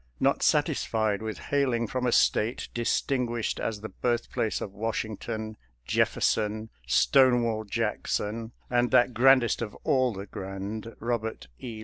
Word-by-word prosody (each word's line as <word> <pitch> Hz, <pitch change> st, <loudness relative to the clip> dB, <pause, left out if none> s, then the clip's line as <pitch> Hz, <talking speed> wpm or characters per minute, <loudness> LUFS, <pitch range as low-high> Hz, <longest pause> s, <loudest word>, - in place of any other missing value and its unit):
Not -, -, +2 dB
satisfied 110 Hz, -2 st, +1 dB
with 110 Hz, -3 st, -4 dB
hailing 130 Hz, -5 st, 0 dB
from 125 Hz, +2 st, -2 dB
a -, -, +2 dB
State 115 Hz, +1 st, +2 dB
distinguished 120 Hz, 0 st, -1 dB
as 105 Hz, -2 st, -3 dB
the 110 Hz, -, -6 dB
birthplace 120 Hz, -2 st, -1 dB
of 100 Hz, -, -6 dB
Wash 110 Hz, +2 st, -2 dB
ington, 110 Hz, 0 st, -6 dB, 0.3 s
Jefferson, 110 Hz, -, 0 dB, 0.2 s
Stonewall 120 Hz, -, +3 dB
Jackson, 110 Hz, +1 st, -2 dB, 0.2 s
and 120 Hz, 0 st, +2 dB
that 125 Hz, -1 st, +4 dB
grandest 130 Hz, -1 st, +4 dB
of 110 Hz, -3 st, -4 dB
all 130 Hz, -2 st, +2 dB
the 100 Hz, -2 st, -7 dB
grand, 100 Hz, +4 st, -6 dB
Robert 110 Hz, -, -3 dB
E. 115 Hz, -3 st, -7 dB
115 Hz, 130 wpm, -27 LUFS, 110-120 Hz, 0.3 s, that